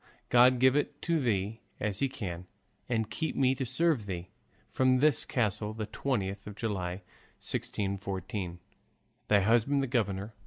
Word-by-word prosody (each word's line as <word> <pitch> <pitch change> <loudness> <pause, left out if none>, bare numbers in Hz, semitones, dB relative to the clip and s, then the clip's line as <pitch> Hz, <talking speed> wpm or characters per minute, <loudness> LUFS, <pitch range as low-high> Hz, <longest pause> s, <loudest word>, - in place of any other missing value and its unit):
God 125 +1 +6
give 130 +1 +5
it 145 0 0
to 170 -1 +2
thee 110 -3 -1 0.2
as 105 -2 -2
he 135 - +1
can, 95 -9 -6 0.4
and 110 -3 0
keep 160 - -2
me 130 -1 +3
to 130 -1 -3
serve 130 -3 +1
thee. 90 -1 -5 0.4
From 130 -1 +3
this 145 -1 +3
castle, 105 -3 -1
the 110 -1 -3
20th 105 -4 -2
of 105 - -7
July, 95 -4 -3 0.3
1614. 95 -2 -3 0.7
Thy 105 - +5
husband, 120 +7 +3
the - - +1
governor. 105 -4 -1
110 Hz, 150 wpm, -30 LUFS, 100-130 Hz, 0.7 s, God